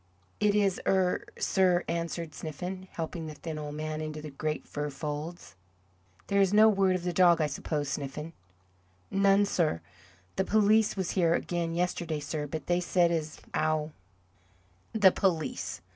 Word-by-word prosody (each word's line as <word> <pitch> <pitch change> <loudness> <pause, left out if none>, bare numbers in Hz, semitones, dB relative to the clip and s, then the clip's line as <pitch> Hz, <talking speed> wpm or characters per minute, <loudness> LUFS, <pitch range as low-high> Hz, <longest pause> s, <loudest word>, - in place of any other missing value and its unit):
"It 210 -1 +3
is 200 -2 +2
'ere, 190 -2 +2
sir," 180 -2 +2
answered 170 -1 -3
Sniffen, 180 +4 -6
helping 165 0 -4
the 155 - -7
thin 155 0 -6
old 150 -1 -6
man 155 0 -3
into 155 0 -5
the 150 -1 -8
great 155 +2 -3
fur 150 0 -3
folds. 150 - -6 0.7
"There 200 0 +2
is 195 -1 +3
no 215 +1 +7
word 195 -3 +3
of 180 - -3
the 180 -1 -1
dog, 175 -1 +5
I 155 - +3
suppose, 150 0 -3
Sniffen?" 150 +3 -4 0.8
"None, 195 +1 +4
sir. 165 - +1 0.6
The 190 - +3
police 215 +1 +3
was 190 -2 -1
here 170 -3 +3
again 170 -1 -2
yesterday 175 -3 -1
sir, 150 +1 -4
but 155 -1 -5
they 175 0 +2
said 175 -1 +2
as 155 -2 -3
'ow 155 0 0 0.5
" 90 +1 -35
"The 190 - +9
police!" 160 - -1
165 Hz, 160 wpm, -29 LUFS, 150-185 Hz, 0.8 s, The